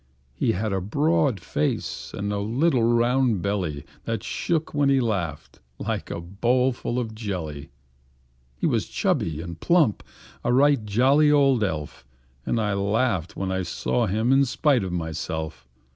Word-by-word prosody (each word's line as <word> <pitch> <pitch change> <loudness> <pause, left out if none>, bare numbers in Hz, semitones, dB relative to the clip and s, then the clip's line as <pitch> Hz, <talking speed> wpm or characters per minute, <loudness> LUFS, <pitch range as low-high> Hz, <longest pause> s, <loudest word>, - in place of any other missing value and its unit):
He - - +1
had 105 +3 -2
a 95 - 0
broad 140 - +1
face, - - -2
and 100 +1 -3
a 100 - -1
little 125 +6 +1
round 120 -2 +2
belly 90 -8 -2 0.2
That - - -2
shook 160 -2 -2
when 145 -2 +2
he 135 -1 +4
laughed, 95 - -3 0.2
like - - -3
a - - -4
bowl 120 +9 +1
full 120 0 -4
of 115 -3 -2
jelly. 90 -10 -5 0.9
He - - -2
was - - +1
chubby 80 -1 -1
and 85 -1 -8
plump 160 - +3 0.4
a 120 - +1
right 140 -1 +4
jolly 135 +8 +4
old 135 -5 +4
elf; 80 -6 -4 0.4
And 115 - +1
I 105 -2 0
laughed 100 -2 0
when 95 -1 -2
I 95 0 0
saw 110 +6 -1
him 110 +6 +1
in 135 +1 +5
spite 135 -2 +2
of 95 - -3
myself. 80 -4 -4
110 Hz, 160 wpm, -24 LUFS, 90-130 Hz, 0.9 s, in